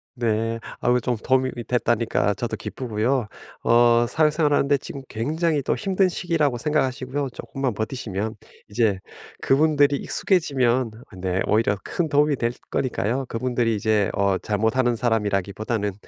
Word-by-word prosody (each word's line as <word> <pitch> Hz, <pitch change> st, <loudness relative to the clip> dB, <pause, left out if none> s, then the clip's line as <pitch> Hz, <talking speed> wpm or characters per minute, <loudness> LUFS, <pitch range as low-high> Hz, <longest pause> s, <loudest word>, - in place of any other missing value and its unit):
네. 115 Hz, -1 st, -1 dB, 0.2 s
아 120 Hz, -, +2 dB
그 125 Hz, -, +4 dB
좀 120 Hz, 0 st, -1 dB
도움이 130 Hz, +3 st, +1 dB
이 120 Hz, -, -5 dB
됐다니까 115 Hz, -3 st, +1 dB
저도 120 Hz, +3 st, -4 dB
기쁘고요. 120 Hz, 0 st, -2 dB, 0.4 s
어 120 Hz, 0 st, +5 dB
사회생활하는데 150 Hz, -2 st, +2 dB
지금 135 Hz, +1 st, -8 dB
굉장히 155 Hz, +6 st, -1 dB
또 -, -, 0 dB
힘든 195 Hz, -2 st, +1 dB
시기라고 155 Hz, -8 st, 0 dB
생각하시고요. 135 Hz, -1 st, -1 dB
쪼끔만 125 Hz, +1 st, -3 dB
버티시면 110 Hz, -2 st, -3 dB, 0.3 s
이제 105 Hz, -3 st, +1 dB, 0.4 s
그분들이 145 Hz, 0 st, +3 dB
익숙해지면 130 Hz, -, +1 dB, 0.3 s
네 90 Hz, 0 st, -1 dB
오히려 105 Hz, -2 st, +2 dB
큰 165 Hz, -3 st, -2 dB
도움이 145 Hz, 0 st, +3 dB
될 120 Hz, -1 st, -1 dB, 0.2 s
거니까요. 130 Hz, +1 st, -1 dB
그분들이 120 Hz, -1 st, 0 dB
이제 105 Hz, -1 st, +1 dB
어 100 Hz, -1 st, +1 dB
잘 105 Hz, +1 st, -2 dB
못 110 Hz, +3 st, +1 dB
하는 120 Hz, -2 st, +2 dB
사람이라기보다는 105 Hz, -2 st, -1 dB
120 Hz, 350 characters per minute, -23 LUFS, 110-140 Hz, 0.4 s, 어